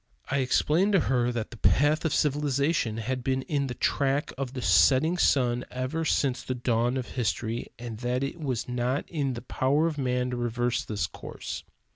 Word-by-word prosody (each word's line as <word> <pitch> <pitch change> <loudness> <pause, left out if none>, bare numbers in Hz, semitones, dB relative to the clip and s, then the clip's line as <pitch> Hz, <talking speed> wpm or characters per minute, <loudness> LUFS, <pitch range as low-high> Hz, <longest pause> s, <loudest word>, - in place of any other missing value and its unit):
I 140 - +2
explained 160 +9 +2
to 195 - +6
her 125 -3 +1
that 115 -3 -4
the 120 - -9
path 150 +8 +3
of 160 - +1
civilization 140 -4 +1
had 125 +3 -3
been 130 0 0
in 140 -1 -1
the 125 - -5
track 140 +3 0
of 135 -1 -4
the 130 - -4
setting 150 +6 +4
sun 125 -5 +3
ever 130 +6 -2
since 130 -4 +1
the 130 - -3
dawn 120 +1 +1
of 125 - -4
history, 115 -1 -2
and 115 -2 -7
that 125 +2 -1
it 140 +5 -4
was 130 -7 -2
not 125 +3 -1
in 140 -6 -1
the 120 - -7
power 140 +5 +1
of 155 -3 -1
man 125 -1 0
to 125 - -3
reverse 120 0 -1
this 100 -6 -2
course. - - -7
130 Hz, 190 wpm, -27 LUFS, 120-145 Hz, -, to